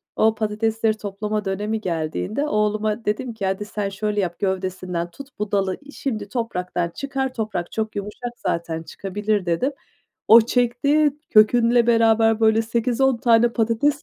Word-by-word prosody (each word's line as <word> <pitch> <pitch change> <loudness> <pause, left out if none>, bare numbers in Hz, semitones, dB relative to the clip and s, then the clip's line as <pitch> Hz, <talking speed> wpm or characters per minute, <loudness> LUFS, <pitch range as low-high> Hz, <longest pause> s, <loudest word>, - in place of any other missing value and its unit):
O 220 0 +3
patatesleri 220 +1 0
toplama 210 +1 -3
dönemi 210 +3 -2
geldiğinde 180 - -2
oğluma 210 -1 0
dedim 230 +4 -2
ki 215 -3 -4
"Hadi, 195 +2 -1
sen 205 -1 -3
şöyle 210 +1 -2
yap 175 -3 -2
gövdesinden 185 -3 -2
tut 275 +6 -11
bu 210 -1 -3
dalı 195 -2 0 0.2
şimdi 215 -7 -4
topraktan 180 -7 -2
çıkar, 270 +5 -3
toprak 215 -7 -3
çok 220 -1 -3
yumuşak 210 +4 -5
zaten 165 -1 -3
çıkabilir." 200 +2 -2
dedim. 210 +12 0 0.6
O 230 +2 +10
çekti, 245 +6 +2 0.2
kökünle 235 +2 +5
beraber, 225 -1 +4
böyle, 220 0 +4
8-10 240 +3 +1
tane 235 -1 +4
patates 235 +6 +1
215 Hz, 140 wpm, -22 LUFS, 195-235 Hz, 0.6 s, O